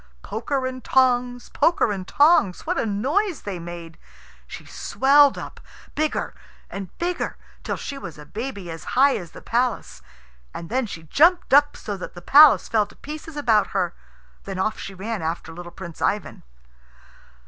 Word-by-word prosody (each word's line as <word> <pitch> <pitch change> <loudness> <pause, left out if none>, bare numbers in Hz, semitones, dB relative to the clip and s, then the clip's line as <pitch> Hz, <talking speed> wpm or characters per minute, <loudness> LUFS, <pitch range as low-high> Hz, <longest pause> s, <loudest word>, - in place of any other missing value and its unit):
Poker 260 +5 -2
and 255 0 -5
tongs, 245 -1 +1
poker 335 -9 +2
and 190 -2 -5
tongs 285 - +3
what - - -1
a - - -1
noise 295 - -1
they 195 -4 -5
made! 170 -1 -9 0.5
She - - -10
swelled 280 +1 +3
up, - - -8 0.3
bigger 310 0 -1 0.4
and 195 -2 -6
bigger, 350 +1 -2 0.3
till - - -2
she 280 -1 -6
was 165 - -9
a 150 - -11
baby 205 - -6
as 165 -1 -8
high 275 +1 +5
as 175 -3 -6
the - - -13
palace. 245 +1 -1 0.5
And 165 - -7
then 255 0 0
she 165 -5 -8
jumped 330 - +3
up 290 +1 +5
so 205 -2 -5
that 185 - -8
the 175 - -9
palace 295 +5 +7
fell 215 -2 +1
to - - -18
pieces 305 +1 -9
about 230 -7 +3
her. 175 -2 0 0.5
Then 195 -1 -5
off 215 +3 -1
she 195 - -7
ran 210 +2 -4
after 165 0 -4
little 175 +1 -9
Prince 170 -3 -10
Ivan. 205 -1 -1
225 Hz, 170 wpm, -23 LUFS, 185-280 Hz, 0.5 s, palace